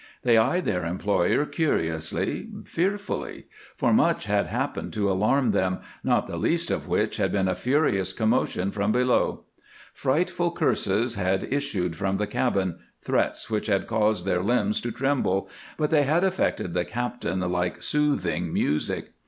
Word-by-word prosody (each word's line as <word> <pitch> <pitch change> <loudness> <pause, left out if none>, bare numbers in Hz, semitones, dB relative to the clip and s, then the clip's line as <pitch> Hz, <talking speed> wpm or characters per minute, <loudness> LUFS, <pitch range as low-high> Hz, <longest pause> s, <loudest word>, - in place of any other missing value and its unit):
They 120 -2 +4
eyed 130 +11 +3
their 90 - 0
employer 95 - +1
curiously, 80 - -1 0.2
fearfully, 200 +3 -2 0.3
for - - +2
much - - +3
had - - +1
happened - - -3
to 100 -2 +1
alarm 110 +8 +2
them, 95 0 +1 0.3
not - - +2
the - - -6
least - - 0
of - - -2
which - - 0
had - - +1
been 95 -2 +1
a 95 - +1
furious 100 - +1
commotion 100 -2 0
from 100 +1 0
below. 125 +2 +1 0.5
Frightful 170 +4 0
curses 115 - +1
had 95 -2 0
issued 100 - -1
from 95 +2 -1
the 105 - 0
cabin, 100 -5 -1 0.2
threats - - -1
which 110 0 -1
had 100 -2 +1
caused 110 -4 +1
their 90 -2 +1
limbs 105 0 +1
to 120 - -3
tremble, 115 -7 0 0.3
but 150 0 0
they 155 -2 +5
had 155 +6 +2
affected 185 - 0
the 90 0 +1
captain 120 -6 -3
like 90 -1 -1
soothing 150 +3 0
music. 75 +1 -1
105 Hz, 155 wpm, -25 LUFS, 95-135 Hz, 0.5 s, they